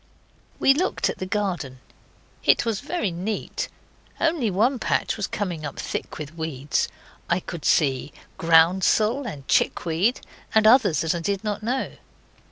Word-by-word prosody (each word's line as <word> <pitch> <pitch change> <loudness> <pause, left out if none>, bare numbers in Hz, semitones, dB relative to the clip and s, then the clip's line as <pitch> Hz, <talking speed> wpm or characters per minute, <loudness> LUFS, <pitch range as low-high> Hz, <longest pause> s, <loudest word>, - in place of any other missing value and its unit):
We 270 - +5
looked 355 +7 0
at - - -11
the 185 - -4
garden. 185 -10 -2 0.7
It - - +4
was 225 -3 -1
very 295 - -2
neat. 215 - -3 0.5
Only 320 -9 +1
one 235 +7 +2
patch - - 0
was 210 -3 -2
coming 180 -6 -3
up 145 -2 -6
thick - - -4
with 150 0 -7
weeds. 150 -4 -1 0.4
I - - +2
could 170 -3 -8
see 140 -2 +2 0.2
groundsel 190 +10 +3
and 140 - -8
chickweed, 180 +9 +1 0.4
and 220 -1 +5
others 215 - +5
that 160 +1 +1
I 170 - -2
did 195 +4 -2
not 210 -1 -2
know. 250 +4 -2
195 Hz, 150 wpm, -24 LUFS, 160-225 Hz, 0.7 s, We